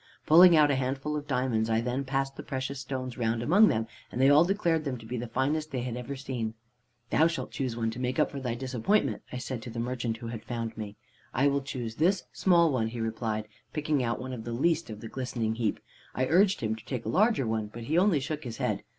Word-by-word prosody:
Pulling 170 Hz, +2 st, +8 dB
out 150 Hz, -1 st, +5 dB
a -, -, +2 dB
handful 135 Hz, +3 st, -2 dB
of 145 Hz, -1 st, -4 dB
diamonds, 125 Hz, -5 st, 0 dB
I 110 Hz, 0 st, +2 dB
then 125 Hz, +3 st, -1 dB
passed 135 Hz, 0 st, -1 dB
the -, -, -6 dB
precious 130 Hz, 0 st, -4 dB
stones 130 Hz, -2 st, -5 dB
round 115 Hz, 0 st, 0 dB
among 195 Hz, -, +6 dB
them, 110 Hz, -, +1 dB, 0.3 s
and -, -, -4 dB
they 135 Hz, +2 st, +6 dB
all 150 Hz, +3 st, +7 dB
declared 170 Hz, -4 st, +1 dB
them 135 Hz, -4 st, -3 dB
to 115 Hz, -, -12 dB
be 120 Hz, +3 st, -4 dB
the 120 Hz, 0 st, -3 dB
finest 145 Hz, +6 st, 0 dB
they 130 Hz, -5 st, -3 dB
had 125 Hz, -2 st, -3 dB
ever 125 Hz, +3 st, -5 dB
seen. 125 Hz, -5 st, -4 dB, 0.6 s
"'Thou 160 Hz, -, +5 dB
shalt 165 Hz, 0 st, -4 dB
choose 130 Hz, -4 st, -3 dB
one, 115 Hz, -1 st, 0 dB
to 115 Hz, -, -7 dB
make 125 Hz, 0 st, -1 dB
up -, -, +2 dB
for 140 Hz, -, -5 dB
thy 125 Hz, -3 st, -2 dB
disappointment,' 130 Hz, -, 0 dB
I 125 Hz, -, -4 dB
said 125 Hz, -1 st, -4 dB
to 115 Hz, -, -7 dB
the 115 Hz, -, -8 dB
merchant 120 Hz, -1 st, -2 dB
who 115 Hz, -1 st, -7 dB
had 115 Hz, -2 st, -6 dB
found 115 Hz, -1 st, -4 dB
me. 105 Hz, -1 st, -6 dB, 0.4 s
"'I 135 Hz, +3 st, +4 dB
will 140 Hz, 0 st, 0 dB
choose 120 Hz, -4 st, -5 dB
this 185 Hz, +5 st, +2 dB
small 170 Hz, -4 st, +4 dB
one,' 120 Hz, -4 st, +1 dB
he 115 Hz, +1 st, -6 dB
replied, 110 Hz, -1 st, -2 dB, 0.3 s
picking 150 Hz, -2 st, 0 dB
out 120 Hz, -1 st, -1 dB
one 130 Hz, 0 st, -5 dB
of 115 Hz, -3 st, -6 dB
the 120 Hz, +1 st, -4 dB
least 160 Hz, +5 st, +1 dB
of 105 Hz, -1 st, -7 dB
the 115 Hz, -, -6 dB
glistening 120 Hz, -3 st, -2 dB
heap. 110 Hz, -2 st, -1 dB, 0.4 s
"I 130 Hz, -, +1 dB
urged 185 Hz, +7 st, +3 dB
him 110 Hz, -1 st, 0 dB
to 110 Hz, -, -13 dB
take 130 Hz, -3 st, -4 dB
a -, -, -2 dB
larger 215 Hz, -, +3 dB
one, 110 Hz, -1 st, -1 dB
but 115 Hz, +2 st, -9 dB
he 150 Hz, +8 st, -1 dB
only 180 Hz, -3 st, +4 dB
shook 150 Hz, +3 st, -4 dB
his 115 Hz, -3 st, -6 dB
head. -, -, -1 dB
130 Hz, 250 wpm, -29 LUFS, 115-145 Hz, 0.6 s, Pulling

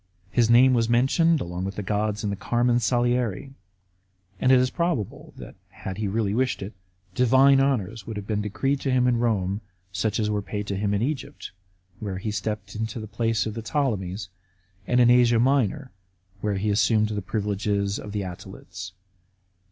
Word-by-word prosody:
His 115 Hz, -1 st, +2 dB
name 125 Hz, +2 st, +6 dB
was 115 Hz, -2 st, +1 dB
mentioned 135 Hz, +6 st, +3 dB
along 90 Hz, +1 st, -4 dB
with 95 Hz, +1 st, -4 dB
the 105 Hz, -, -4 dB
gods 105 Hz, +1 st, -1 dB
in 105 Hz, -, -1 dB
the -, -, -2 dB
Carmen 120 Hz, +4 st, +1 dB
Saliare, 120 Hz, 0 st, 0 dB, 0.9 s
and 130 Hz, -, +3 dB
it 130 Hz, -, +7 dB
is 125 Hz, 0 st, +2 dB
probable 170 Hz, -, -2 dB
that, -, -, -10 dB, 0.3 s
if 95 Hz, -1 st, -4 dB
he 110 Hz, -, -2 dB
had 100 Hz, -, -2 dB
really 105 Hz, -3 st, 0 dB
wished 130 Hz, -3 st, 0 dB
it, 100 Hz, -, -7 dB, 0.4 s
divine 130 Hz, +4 st, +5 dB
honours 115 Hz, -6 st, -1 dB
would 110 Hz, -2 st, -5 dB
have 100 Hz, -, -6 dB
been 105 Hz, 0 st, -1 dB
decreed 135 Hz, +7 st, -1 dB
to -, -, -1 dB
him 125 Hz, -1 st, +3 dB
in 120 Hz, -2 st, +2 dB
Rome, 100 Hz, -4 st, 0 dB, 0.3 s
such 110 Hz, +2 st, -1 dB
as 105 Hz, -, +1 dB
were 105 Hz, -1 st, -1 dB
paid 105 Hz, +1 st, -5 dB
to 100 Hz, -, -3 dB
him 100 Hz, +1 st, 0 dB
in 100 Hz, -, 0 dB
Egypt, 140 Hz, 0 st, -4 dB, 0.5 s
where 100 Hz, -3 st, -4 dB
he 105 Hz, +3 st, -3 dB
stepped 105 Hz, -1 st, -4 dB
into 110 Hz, +1 st, -4 dB
the 110 Hz, -, -6 dB
place 110 Hz, -1 st, -1 dB
of 110 Hz, -, -3 dB
the 115 Hz, -, -5 dB
Ptolemies, 105 Hz, -8 st, -2 dB, 0.6 s
and 125 Hz, -, +2 dB
in 120 Hz, -1 st, +6 dB
Asia 120 Hz, -1 st, +5 dB
Minor, 130 Hz, +1 st, +1 dB, 0.5 s
where 105 Hz, 0 st, -1 dB
he 105 Hz, +2 st, 0 dB
assumed 110 Hz, +1 st, +2 dB
the 105 Hz, -1 st, -3 dB
privileges 100 Hz, 0 st, -1 dB
of 105 Hz, -, -8 dB
the 105 Hz, 0 st, -2 dB
Attalids. 95 Hz, 0 st, -8 dB
110 Hz, 190 wpm, -25 LUFS, 100-125 Hz, 0.9 s, it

